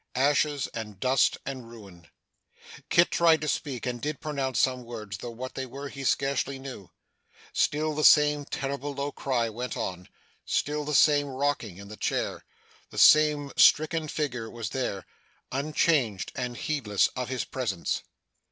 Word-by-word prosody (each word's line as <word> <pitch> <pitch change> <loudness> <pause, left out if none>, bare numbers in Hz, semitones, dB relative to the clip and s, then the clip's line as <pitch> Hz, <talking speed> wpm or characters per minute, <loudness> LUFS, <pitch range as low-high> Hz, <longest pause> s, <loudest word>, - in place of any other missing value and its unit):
Ashes, 145 +1 +2
and 105 -4 -7
dust, 130 +3 +3
and 130 -4 -6
ruin! 100 -7 -13 0.8
Kit 170 - +4
tried 165 -2 +4
to 155 - -2
speak, 135 -4 -2
and 120 -1 -3
did 150 0 -3
pronounce 140 -5 -2
some 130 -1 +2
words, 110 -4 -7
though 120 - -6
what 125 +3 -7
they 130 0 -4
were 140 +3 -7
he 140 -1 -8
scarcely 135 0 0
knew. 130 -8 -9 0.6
Still 155 +1 +1
the 150 +1 -2
same 150 -1 +6
terrible 140 +1 -4
low 140 +1 -2
cry 125 -5 -1
went 120 +3 -5
on 90 -1 -4 0.3
still 150 0 -1
the 150 0 -1
same 145 +1 +5
rocking 135 -8 -2
in 100 0 -10
the 105 +1 -10
chair - - -2 0.5
the - - -12
same 150 -2 +6
stricken 155 +1 +5
figure 125 -7 -3
was 115 -1 -6
there, 125 -7 -3 0.5
unchanged 140 - +1
and 125 -1 -4
heedless 125 -11 +1
of 125 -1 -5
his 130 -2 -2
presence. 110 -10 -2
135 Hz, 155 wpm, -27 LUFS, 120-145 Hz, 0.8 s, same